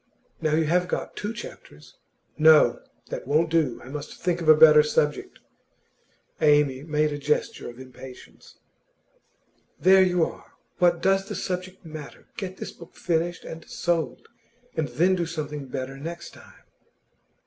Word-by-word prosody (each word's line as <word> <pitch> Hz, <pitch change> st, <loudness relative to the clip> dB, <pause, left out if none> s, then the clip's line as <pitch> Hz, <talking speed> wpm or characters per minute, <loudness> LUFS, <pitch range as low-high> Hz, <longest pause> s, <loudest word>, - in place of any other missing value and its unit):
Now 155 Hz, -1 st, +1 dB
you 160 Hz, 0 st, +2 dB
have 180 Hz, +3 st, +1 dB
got -, -, -4 dB
two 210 Hz, -, -4 dB
chapters 75 Hz, -, -11 dB, 0.2 s
' -, -, -47 dB
'No; 155 Hz, 0 st, +6 dB, 0.3 s
that -, -, -5 dB
won't 160 Hz, +3 st, +2 dB
do. 155 Hz, -7 st, +1 dB
I -, -, -11 dB
must 145 Hz, +1 st, -7 dB
think 175 Hz, -1 st, -1 dB
of 160 Hz, -, 0 dB
a 155 Hz, -, +10 dB
better 150 Hz, 0 st, +8 dB
subject.' 150 Hz, 0 st, -1 dB, 1.0 s
Amy 145 Hz, -3 st, +3 dB
made 150 Hz, 0 st, 0 dB
a 145 Hz, -, -5 dB
gesture 150 Hz, -3 st, -1 dB
of 120 Hz, -, -12 dB
impatience. 130 Hz, 0 st, -13 dB, 1.2 s
'There 190 Hz, +1 st, +6 dB
you 180 Hz, -3 st, +3 dB
are! -, -, -11 dB, 0.3 s
What 175 Hz, -1 st, +3 dB
does 195 Hz, +1 st, +2 dB
the -, -, -4 dB
subject 185 Hz, 0 st, -5 dB
matter? 155 Hz, -3 st, -10 dB
Get 190 Hz, -3 st, -6 dB
this -, -, -6 dB
book 170 Hz, -, -15 dB
finished 170 Hz, 0 st, -1 dB
and 165 Hz, 0 st, -8 dB
sold, 160 Hz, -8 st, -2 dB, 0.5 s
and 160 Hz, -2 st, -1 dB
then 180 Hz, +5 st, +2 dB
do 175 Hz, -3 st, -1 dB
something 150 Hz, -3 st, -5 dB
better 130 Hz, +1 st, -5 dB
next 170 Hz, +4 st, -7 dB
time. -, -, -17 dB
160 Hz, 155 wpm, -25 LUFS, 150-175 Hz, 1.2 s, a